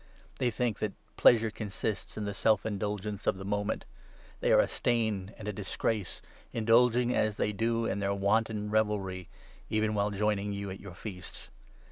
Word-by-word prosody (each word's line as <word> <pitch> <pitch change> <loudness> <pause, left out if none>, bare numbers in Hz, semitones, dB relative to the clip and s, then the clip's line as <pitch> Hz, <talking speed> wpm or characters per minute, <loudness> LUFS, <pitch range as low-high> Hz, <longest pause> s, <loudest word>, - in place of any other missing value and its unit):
They 125 - +2
think 115 -1 -1
that 105 -2 -1 0.2
pleasure 115 -2 +5
consists 105 -1 -4
in 105 - -2
the 100 - -2
self 110 +2 +2
indulgence 105 -1 -3
of - - +2
the 95 - -7
moment. 105 0 -1 0.5
They - - +2
are - - +7
a - - +4
stain 110 -5 0
and 105 - -8
a 105 - -1
dis 100 0 -5
grace, 105 -5 -1 0.3
indulging, 120 +2 +4
as 105 -1 +1
they 105 - +1
do, 115 +2 +1
in 100 - -1
their 100 0 0
wanton 105 +1 +1
revelry, 100 -4 0 0.4
even 110 0 +1
while 100 0 +1
joining 105 0 0
you 100 -1 -4
at 95 - -7
your 100 -3 -10
feasts. 95 -3 -8
105 Hz, 175 wpm, -30 LUFS, 100-110 Hz, 0.5 s, are